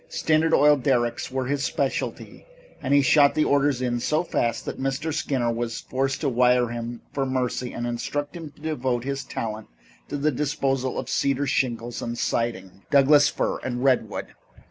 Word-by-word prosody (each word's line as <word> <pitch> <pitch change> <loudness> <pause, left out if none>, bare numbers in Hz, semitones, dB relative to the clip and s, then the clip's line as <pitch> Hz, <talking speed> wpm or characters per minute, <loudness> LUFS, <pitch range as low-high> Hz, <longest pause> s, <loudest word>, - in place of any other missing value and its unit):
Standard 160 - +1
oil 150 -1 +5
derricks 120 -3 0
were 130 0 -2
his 140 +1 -1
specialty - - -3 0.3
and 135 - -3
he 140 0 +5
shot 140 +1 +5
the 155 - +3
orders 140 -2 +2
in 120 -1 0
so 155 +7 +1
fast 115 -8 -1
that - - -5
Mr. 135 +4 -2
Skinner 125 -6 0
was 115 -1 -3
forced 135 0 -2
to 150 - 0
wire 125 -1 +3
him 120 0 -6
for 140 - 0
mercy 125 -1 -2
and 120 - -4
instruct 145 +6 -3
him 165 -3 -7
to 145 - -22
devote 130 -6 -1
his 135 0 -3
talent 110 -4 -5 0.4
to - - -3
the 150 +2 +1
disposal 135 -2 -1
of - - -4
cedar 140 0 0
shingles 120 -3 -1
and 120 0 -4
siding, 100 -6 -2
Douglas 145 +1 +6
fir - - -2
and 125 -1 -4
redwood. 125 -5 +1
130 Hz, 175 wpm, -24 LUFS, 120-145 Hz, 0.4 s, Douglas